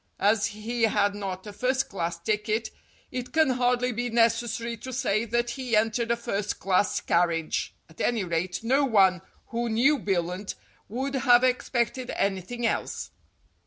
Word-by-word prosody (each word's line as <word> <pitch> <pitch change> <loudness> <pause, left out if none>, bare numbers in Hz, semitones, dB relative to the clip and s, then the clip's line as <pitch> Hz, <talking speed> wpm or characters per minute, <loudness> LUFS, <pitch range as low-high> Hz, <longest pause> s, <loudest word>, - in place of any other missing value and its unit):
As 210 +1 +3
he 220 +3 -5
had 205 -2 +2
not 195 -2 -5
a 210 - -8
first 260 +5 0
class 170 -3 -3
ticket, 215 +4 -1 0.4
it 250 -1 -5
can 315 -4 +3
hardly 250 0 +1
be 245 +1 -2
necessary 230 0 +1
to 260 +4 -8
say 230 -3 0
that 240 +1 0
he 250 -2 -2
entered 225 +2 +1
a 235 - +3
first 210 -4 -3
class 195 +1 +2
carriage. 170 -2 0
At 160 - -10
any 230 -4 +1
rate, 180 +2 -2
no 265 +5 +3
one 195 -8 +4 0.3
who 235 0 -2
knew 265 +7 +3
Billunt 185 -1 -2 0.3
would 265 +6 -3
have 250 -2 +5
expected 250 -1 0
anything 200 +5 -1
else. - - -2
225 Hz, 155 wpm, -27 LUFS, 200-245 Hz, 0.4 s, have